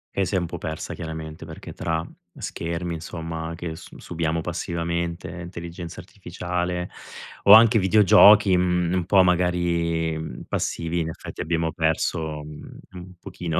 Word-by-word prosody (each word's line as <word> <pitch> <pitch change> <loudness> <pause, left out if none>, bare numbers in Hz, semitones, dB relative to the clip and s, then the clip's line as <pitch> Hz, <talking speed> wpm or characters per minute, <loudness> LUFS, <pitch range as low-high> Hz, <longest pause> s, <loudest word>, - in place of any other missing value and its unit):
E 100 - +1
si 100 - -2
è - - +4
un 85 - 0
po' 85 0 -6
persa 80 0 -5
chiaramente 80 -1 -7
perché 80 0 -9
tra 80 0 -2 0.3
schermi, 85 +1 -4
insomma, 80 0 -5
che 85 -1 -5
s - - -13
subiamo 85 -1 -2
passivamente, 85 +1 -3
intelligenza 85 0 -8
artificiale 90 -1 -4 0.6
o 100 - +10
anche 110 0 +8
videogiochi, 105 0 +7
mhmm, 90 -1 +1
un 90 -2 0
po' 95 +1 +5
magari, 85 -2 +1
mhmm, 80 0 -6
passivi, 85 +1 -2
in 80 -1 -1
effetti, - - -8
abbiamo 80 0 -1
perso, 80 -1 -1
mhmm, 75 0 -11
un 90 0 -10
pochino 90 -4 -3
85 Hz, 145 wpm, -24 LUFS, 80-90 Hz, 0.6 s, o